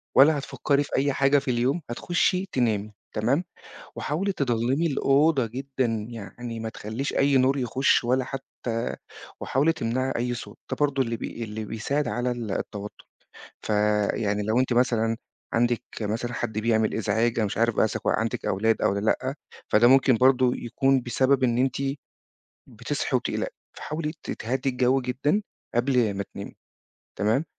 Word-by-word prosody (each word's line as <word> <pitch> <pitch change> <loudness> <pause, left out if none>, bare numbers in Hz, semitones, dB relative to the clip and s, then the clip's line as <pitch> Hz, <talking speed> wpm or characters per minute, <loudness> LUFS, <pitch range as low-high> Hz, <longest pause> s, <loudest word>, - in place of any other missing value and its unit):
ولا 145 +3 +7
هتفكري 140 0 0
في 140 - -5
أي 140 +1 +2
حاجة 135 +1 +4
في 135 -1 -2
اليوم 130 +7 +1
هتخشّي 180 +8 +1
تنامي، 110 -4 0 0.2
تمام، 130 +11 +1 0.5
وحاولي 190 +7 -1
تضلّمي 130 +2 0
الأوضة 140 -1 +3
جدًا، 130 +2 -2 0.2
يعني 115 +1 -7
ما 110 - -3
تخلّيش 110 +6 -4
أي 140 0 +3
نور 130 +2 +3
يخُش 130 +1 +2
ولا 125 +2 +2
حتّى 125 -3 -4 0.4
وحاولي 145 +5 +2
تمنعي 130 -2 -1
أي 120 +1 -1
صوت، 120 - -9
ده - - -1
برضو 140 -2 +2
اللي 115 -2 -2
بي 115 - -5
اللي 110 0 -5
بيساعد 125 +7 -2
على 120 +1 -1
التوتّر، 105 -3 -5 0.6
فيعني 105 0 +1
لو 110 +4 +1
أنتِ 130 -1 +1
مثلًا 115 -2 +2 0.4
عندِك 120 0 +2 0.2
مثلًا 115 +3 -2
حد 110 -3 -2
بيعمل 110 -1 +2
إزعاج 110 +2 +1
أنا 110 - +2
مش 100 - -4
عارف 115 0 +2
بقى - - +4
إذا 110 - -3
عندِك 110 0 0
أولاد 110 +4 +1
أو - - +3
ل 100 +2 -2
لأ، 130 +4 0 0.3
فده 115 +3 +5
ممكن 135 -1 +5
برضو 130 0 +4
يكون 135 +3 +1
بسبب 130 +2 +2
إن 120 -1 +2
أنتِ 130 +1 +1 0.9
بتصحي - - -2
وبتقلقي، - - -2 0.2
فحاولي 155 0 -4
ت - - -6
تهدّي 130 +4 -2
الجو 125 +1 +2
جدًا 145 - 0 0.3
قبل 120 -4 +2
ما 100 0 -3
تنامي، - - -7 0.6
تمام، 110 +9 +1
125 Hz, 155 wpm, -26 LUFS, 115-135 Hz, 0.9 s, ولا